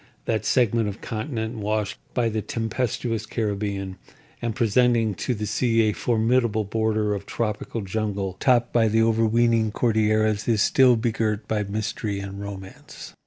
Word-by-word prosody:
That 110 -2 -1
segment 115 -3 +2
of 100 - -7
continent 110 0 -4
washed 105 -1 -2 0.2
by 120 -2 +2
the 110 -1 -2
tempestuous 115 -1 -2
Caribbean, 100 -4 -3 0.4
and 115 -2 -2
presenting 115 -1 +2
to 120 +6 -2
the 105 0 -3
sea 115 +1 +2
a 105 -1 +2
formidable 115 -1 +1
border 110 0 0
of 100 -1 -5
tropical 110 0 -3
jungle 100 -1 -2
topped 120 -3 +2
by 115 -2 +4
the 110 +1 +3
overweening 115 0 +2
Cordilleras, 110 -2 +1
is 110 -3 +3
still 130 0 +5
begirt 110 -2 -1
by 110 -1 0
mystery 105 0 -3
and 100 0 -7
romance. 95 -1 -9
110 Hz, 145 wpm, -24 LUFS, 105-115 Hz, 0.4 s, still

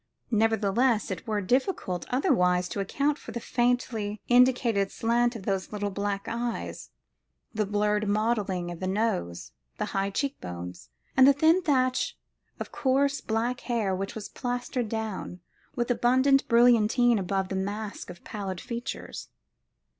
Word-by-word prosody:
Nevertheless, 220 0 +2
it 185 +2 -6
were 210 -2 0
difficult 245 - -1
otherwise 180 - +2
to - - -4
account 285 +9 0
for - - -9
the 235 - -4
faintly 235 -4 -1
indicated 245 -5 +3
slant 240 +1 +1
of 215 - -7
those 195 -1 -2
little 205 -1 -2
black 200 0 -2
eyes, 235 0 -4 0.6
the 215 -2 0
blurred 210 +1 +1
modelling 205 -4 0
of 170 - -8
the 185 - -3
nose, 85 - -1 0.3
the - - -1
high 195 0 0
cheekbones, 90 - -5 0.3
and 265 0 +7
the 280 - +7
thin 320 +6 +4
thatch 255 -6 +1 0.4
of - - -6
coarse 280 +2 +1
black 235 +3 -1
hair 220 -6 -1
which 195 +4 -4
was 215 -2 -6
plastered 245 -2 -3
down 220 -5 -4 0.4
with 240 0 0
abundant 260 +3 +3
brilliantine 235 0 +4
above 190 0 -1
that 190 - -3
mask 205 +1 -4
of 175 -1 -11
pallid 195 -4 -5
features. 240 0 -6
220 Hz, 140 wpm, -27 LUFS, 195-245 Hz, 0.6 s, and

